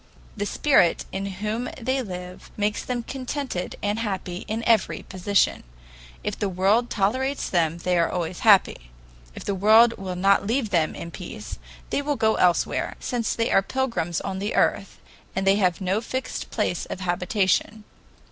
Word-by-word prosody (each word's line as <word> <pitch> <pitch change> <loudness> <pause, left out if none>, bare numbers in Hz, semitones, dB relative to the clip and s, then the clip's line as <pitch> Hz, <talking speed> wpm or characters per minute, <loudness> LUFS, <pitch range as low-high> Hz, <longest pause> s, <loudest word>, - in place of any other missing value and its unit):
The 205 -1 -2
Spirit 265 - +3
in 195 +1 -3
whom 210 +5 -3
they 260 +3 0
live 180 -4 -8
makes 210 0 0
them 245 -2 -3
contented 260 -6 -4
and 205 +2 0
happy 190 -4 -4
in 225 +1 -3
every 230 -2 +2
position. 190 +2 +1 0.6
If - - -3
the 205 - 0
world 195 +6 +2
tolerates 260 +7 0
them, 170 -2 +1
they 180 0 0
are 165 - +2
always 175 0 -3
happy. 195 - +4 0.5
If - - -8
the 200 - 0
world 220 +4 +6
will 185 -2 -4
not 195 +2 +3
leave 230 -2 0
them 165 -4 +1
in 170 - -7
peace, 145 - -8 0.3
they - - +1
will 290 0 -1
go 220 -3 +2
elsewhere, 180 -2 +1
since 240 -3 -2
they 230 0 0
are - - +5
pilgrims 215 -8 -1
on 190 -1 -4
the 205 +2 -2
earth - - +1 0.4
and 190 - -1
they 195 +1 +5
have 185 -4 +2
no 190 +3 0
fixed 260 +3 -4
place 210 -6 -1
of 185 - -6
habitation. 185 +4 0
200 Hz, 165 wpm, -24 LUFS, 180-230 Hz, 0.6 s, world